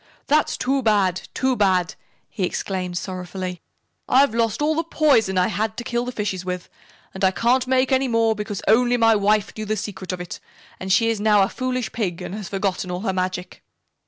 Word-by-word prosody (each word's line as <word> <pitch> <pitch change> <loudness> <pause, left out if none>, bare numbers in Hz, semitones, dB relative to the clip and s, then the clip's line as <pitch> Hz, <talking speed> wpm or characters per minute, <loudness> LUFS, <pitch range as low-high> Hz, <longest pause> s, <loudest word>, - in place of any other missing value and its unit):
"That's 305 +1 +2
too 270 +1 0
bad 200 -5 +1
too 260 -1 +1
bad!" 185 -4 +2 0.3
he - - -8
exclaimed 180 -1 -2
sorrowfully. 185 -1 -5 0.5
"I've 265 -2 +4
lost 230 -3 0
all 300 +1 +2
the 325 +1 0
poison 280 - +2
I 180 - +3
had 215 +3 -2
to 240 - -4
kill 240 0 -2
the 250 - -4
fishes 205 -5 -3
with, 180 -1 -5 0.4
and 190 - -6
I 190 - +6
can't 245 +6 +1
make 260 0 +2
any 265 0 +3
more 230 -2 +2
because 210 -1 -5
only 245 +3 +4
my 225 -1 +5
wife 210 0 +1
knew 215 - -5
the 215 +1 -1
secret 190 -3 -5
of 185 - -4
it, 180 -1 -7 0.4
and 190 0 -4
she 230 +3 +4
is 215 -2 -3
now 210 -2 +5
a 195 - 0
foolish 255 -2 -3
Pig 185 -7 -2
and - - -6
has 205 -4 -6
forgotten 195 -2 -2
all 180 0 -3
her 195 -3 -1
magic." 185 -1 -3
210 Hz, 205 wpm, -22 LUFS, 185-240 Hz, 0.5 s, I